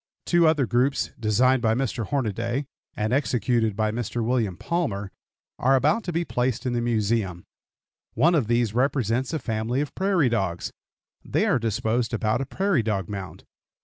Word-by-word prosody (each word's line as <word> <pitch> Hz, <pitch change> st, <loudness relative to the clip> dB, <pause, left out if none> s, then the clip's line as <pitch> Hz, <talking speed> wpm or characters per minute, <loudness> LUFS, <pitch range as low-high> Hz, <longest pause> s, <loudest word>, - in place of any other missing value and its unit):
Two 175 Hz, -2 st, +4 dB
other 155 Hz, -4 st, +3 dB
groups 125 Hz, +4 st, +1 dB
designed 120 Hz, +4 st, +3 dB
by 110 Hz, -1 st, +2 dB
Mr. 120 Hz, -4 st, -2 dB
Hornaday, 120 Hz, +1 st, -1 dB, 0.3 s
and 110 Hz, +2 st, -1 dB
executed 120 Hz, -5 st, +1 dB
by 110 Hz, 0 st, 0 dB
Mr. 120 Hz, 0 st, -3 dB
William 115 Hz, -7 st, 0 dB
Palmer, 105 Hz, -, -2 dB, 0.5 s
are 135 Hz, +2 st, +4 dB
about 150 Hz, -, +2 dB
to 175 Hz, -, -2 dB
be 170 Hz, +1 st, -1 dB
placed 125 Hz, -2 st, -1 dB
in 125 Hz, -, 0 dB
the 120 Hz, -, 0 dB
Museum. 110 Hz, -6 st, 0 dB, 0.7 s
One 170 Hz, +3 st, +4 dB
of 145 Hz, -10 st, +2 dB
these 120 Hz, -2 st, +1 dB
represents 125 Hz, 0 st, 0 dB
a 160 Hz, -, 0 dB
family 115 Hz, -1 st, -2 dB
of 145 Hz, 0 st, -3 dB
prairie 190 Hz, -6 st, +2 dB
dogs. 95 Hz, -7 st, -1 dB, 0.5 s
They -, -, 0 dB
are -, -, +2 dB
disposed 115 Hz, +1 st, -1 dB
about 110 Hz, +3 st, 0 dB
a 135 Hz, -, -4 dB
prairie 190 Hz, -4 st, +1 dB
dog 100 Hz, -5 st, -2 dB
mound. 100 Hz, -3 st, -7 dB
120 Hz, 165 wpm, -25 LUFS, 110-135 Hz, 0.7 s, Two